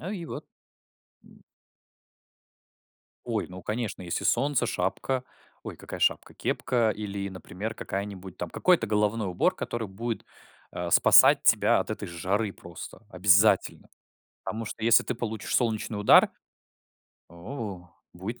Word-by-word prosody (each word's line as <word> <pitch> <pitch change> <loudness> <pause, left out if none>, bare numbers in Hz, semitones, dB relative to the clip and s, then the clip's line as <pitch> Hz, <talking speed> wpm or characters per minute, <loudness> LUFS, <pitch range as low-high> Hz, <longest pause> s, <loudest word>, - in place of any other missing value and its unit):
Ну, 185 - -5
и 180 -5 -5
вот. - - -7 0.8
М. - - -19 1.8
Ой, 115 -4 -1
ну, 90 0 -10
конечно, 110 -3 -4
если 85 -1 -3
солнце, 135 0 +2
шапка 115 +6 -2 0.4
Ой, - - -7
какая - - -8
шапка? - - 0
Кепка 120 -3 0
или, 100 -2 -4
например, 95 +4 -6
какая-нибудь 95 -2 -6
там 90 - -5
какой-то 175 -11 +2
головной 105 0 0
убор, 90 - +1
который 115 -3 -4
будет, 115 +4 -5 0.4
а, 90 -1 -4
спасать - - +7
тебя - - +4
от - - -4
этой - - -4
жары 95 +5 -2
просто, 85 +4 -11
обязательно. 95 +3 +3 0.6
Потому 115 +1 -4
что, 110 +1 -7
если 115 0 +6
ты 125 - -3
получишь 110 -2 -3
солнечный 110 -3 -1
удар, 105 - +6 1.0
о, 90 - -7 0.2
будет 100 +7 -7
105 Hz, 130 wpm, -27 LUFS, 95-115 Hz, 1.8 s, спасать